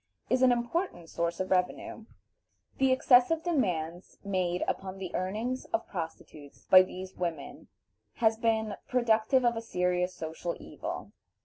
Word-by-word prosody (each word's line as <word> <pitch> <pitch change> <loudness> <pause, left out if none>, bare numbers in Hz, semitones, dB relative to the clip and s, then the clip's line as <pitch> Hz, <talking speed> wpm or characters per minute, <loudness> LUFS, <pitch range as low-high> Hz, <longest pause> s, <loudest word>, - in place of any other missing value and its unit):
is 255 0 +3
an 255 -1 +6
important 240 - -2
source 170 0 -2
of 185 - -3
revenue. 185 +4 -1 0.7
The 265 -1 +4
excessive 260 +5 +4
demands 180 - -1
made 185 -2 0
upon 190 0 -3
the 190 -2 -6
earnings 220 +8 -2
of 335 - -2
prostitutes 160 -5 -8
by 185 - +9
these 185 0 -6
women 180 - -5 0.5
has 225 -1 +3
been 220 -2 0
productive 240 0 +2
of 235 -1 +3
a 225 - -3
serious 180 -3 0
social 165 0 -4
evil. - - -7
195 Hz, 135 wpm, -30 LUFS, 180-245 Hz, 0.7 s, by